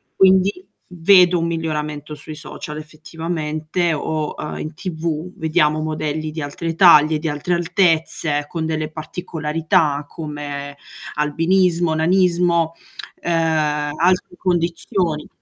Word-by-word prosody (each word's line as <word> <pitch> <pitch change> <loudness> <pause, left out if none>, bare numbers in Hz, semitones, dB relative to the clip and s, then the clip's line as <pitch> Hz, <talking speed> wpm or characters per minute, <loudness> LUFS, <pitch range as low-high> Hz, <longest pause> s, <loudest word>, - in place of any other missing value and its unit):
Quindi 190 - +4 0.3
vedo 180 +1 +6
un 165 - 0
miglioramento 150 -2 -3
sui 150 +1 -9
social, 150 0 -7
effettivamente 155 +1 -3
o, 155 0 -2
ehm, - - -5
in 155 - -5
TV, 165 0 -4
vediamo 155 -1 +2
modelli 155 0 -3
di 155 +1 -5
altre 165 +3 -4
taglie, 155 -3 +6
di 160 +1 -2
altre 150 +4 -2
altezze, 165 -4 +1
con 160 +1 -3
delle 155 -1 -2
particolarità 155 -1 -1
come, 145 -2 -6 0.4
albinismo, 165 +3 +2
nanismo, 170 -1 +2 0.5
ehm, 155 -3 0
altre 180 +1 +1
condizioni. 170 -2 -1
160 Hz, 110 wpm, -20 LUFS, 150-175 Hz, 0.5 s, vedo